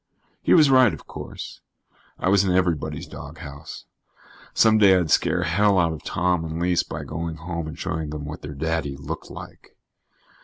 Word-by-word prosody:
He - - +4
was 150 -5 +6
right, 130 -4 +6
of - - -15
course. - - -8 0.6
I - - -2
was 100 +1 +5
in 95 - +1
everybody's 80 -5 0
doghouse. 75 0 -9 0.7
Some 110 -1 +4
day 95 -3 +7
I'd 85 -4 0
scare 90 - +3
hell 100 +4 +3
out 85 -3 +3
of 80 - -8
Tom 90 -2 0
and 80 0 -4
Lise 90 0 +2
by - - -6
going 80 +1 -4
home 85 0 -5
and 80 - -7
showing 80 -1 -3
them 75 -1 -5
what 75 +2 -7
their 75 0 -7
daddy 80 -2 -2
looked 70 - -6
like. - - -12
85 Hz, 180 wpm, -24 LUFS, 75-90 Hz, 0.7 s, day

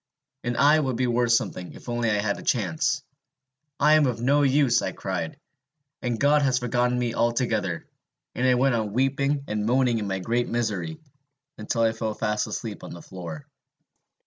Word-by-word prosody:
And 120 0 -2
I 150 +2 +5
would 130 -5 -1
be 125 +2 +1
worth 120 -1 +1
something, 90 -6 -1
if - - -14
only 120 -1 0
I 105 - +2
had 100 0 -1
a - - -8
chance! 140 - 0 0.8
'I 150 +2 +5
am 155 -2 +5
of 120 -3 -2
no 140 +5 +3
use,' 135 -3 +3
I - - -3
cried, - - -4 0.6
'and 120 -3 -2
God 145 +1 +4
has 130 -3 +2
forgotten 125 0 +1
me 120 -2 -1
altogether!' 115 -7 0 0.5
And 125 +1 0
I 125 - +5
went 130 +1 +3
on 110 -3 -1
weeping 140 +3 +1
and 105 0 -2
moaning 125 -1 +2
in 105 - -3
my 95 -1 -1
great 120 +6 -1
misery, 120 - -2 0.6
until 110 +2 -1
I 115 - +4
fell 110 -1 -3
fast 105 0 -1
asleep - - -5
on - - -8
the 85 - -10
floor. 85 -5 -8
120 Hz, 185 wpm, -25 LUFS, 110-135 Hz, 0.8 s, I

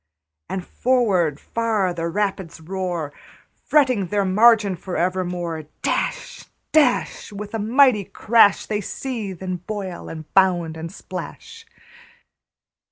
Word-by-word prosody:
And 185 -2 -4
forward 195 - +1
far 220 -6 0
the 165 -1 -3
rapids 190 -2 -2
roar, 175 -3 -4 0.5
Fretting 255 -10 +3
their 200 +2 0
margin 210 0 +5
for 180 +1 -5
evermore. 175 -3 -2 0.2
Dash, - - -2 0.3
dash, 290 -7 +2
With 205 +1 -7
a 225 - -2
mighty 230 -1 +4
crash, 210 +1 +4
They 210 -1 -2
seethe, 205 -5 -5
and 185 -2 -4
boil, 195 -5 -5
and 160 -1 -7
bound, 175 -4 +3
and 165 +1 -6
splash. 455 - -9
195 Hz, 115 wpm, -22 LUFS, 175-225 Hz, 0.5 s, margin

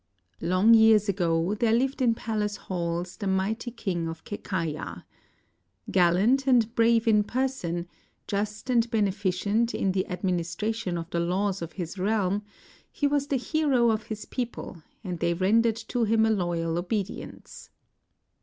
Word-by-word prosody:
] 90 - -49
Long 185 +6 +4
years 220 -2 +6
ago 175 -1 +1
there 220 +1 +1
lived 265 +4 +1
in 235 -3 +3
palace 210 -2 -2
halls 175 -1 -4
the 200 - -4
mighty 200 +5 -1
King 190 -8 -3
of 165 0 -7
Kekaya. 165 -6 -4 0.9
Gallant 195 +10 +3
and 235 -3 +3
brave 230 -1 +3
in 210 -2 +5
person, 205 -9 -2 0.4
just 210 +4 -3
and 235 -1 +3
beneficent 205 +1 0
in 195 - +1
the 185 0 -1
administration 180 +2 -2
of 165 -1 -5
the 170 - 0
laws 185 +3 0
of 170 - -6
his 180 0 -6
realm, 200 0 +1 0.5
he 290 - -2
was 285 0 +1
the 280 - +1
hero 260 -4 +2
of 215 0 -2
his 215 -1 -6
people 240 -8 -5 0.2
and 180 -4 -4
they 170 +1 +1
rendered 220 +5 +3
to 245 -2 0
him 220 +1 +3
a 220 - +2
loyal 170 -4 -1
obedience. 195 +2 -5
205 Hz, 150 wpm, -27 LUFS, 180-230 Hz, 0.9 s, years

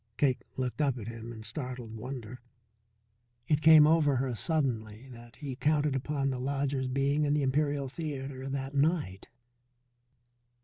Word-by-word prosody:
Cake 135 -4 +2 0.2
looked 130 +3 -2
up 135 -4 +1
at 110 -3 -7
him 115 0 -7
in 110 -2 -9
startled 125 -3 -5
wonder. 125 +1 -7 1.1
It 150 -1 +2
came 160 -1 +8
over 155 -3 +4
her 130 0 -1
suddenly 120 -5 -2
that 120 -1 -13
he 140 -3 -6
counted 150 0 +1
upon 140 +1 -1
the 130 - -3
lodger's 135 0 -1
being 140 +3 +1
in 145 0 +2
the 150 - +1
Imperial 145 +1 +1
Theatre 135 -2 -5
that 135 0 -4
night. 140 - 0
135 Hz, 145 wpm, -30 LUFS, 125-145 Hz, 1.1 s, came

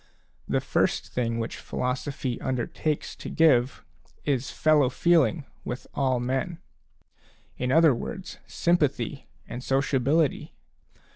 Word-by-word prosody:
The - - +1
first - - 0
thing 115 -2 -1
which 115 0 -3
philosophy 130 0 -3
undertakes 130 +4 -2
to - - -7
give 135 -6 +3 0.4
is 135 -2 0
fellow 150 -4 +3
feeling 155 -2 +2 0.2
with 125 - -5
all 130 -3 +1
men; 135 +8 -2 1.0
in 125 0 -2
other 160 -1 +6
words, 185 - -6
sympathy 150 -3 0 0.2
and 120 +1 -6
sociability. 135 +2 +1
135 Hz, 110 wpm, -26 LUFS, 125-155 Hz, 1.0 s, other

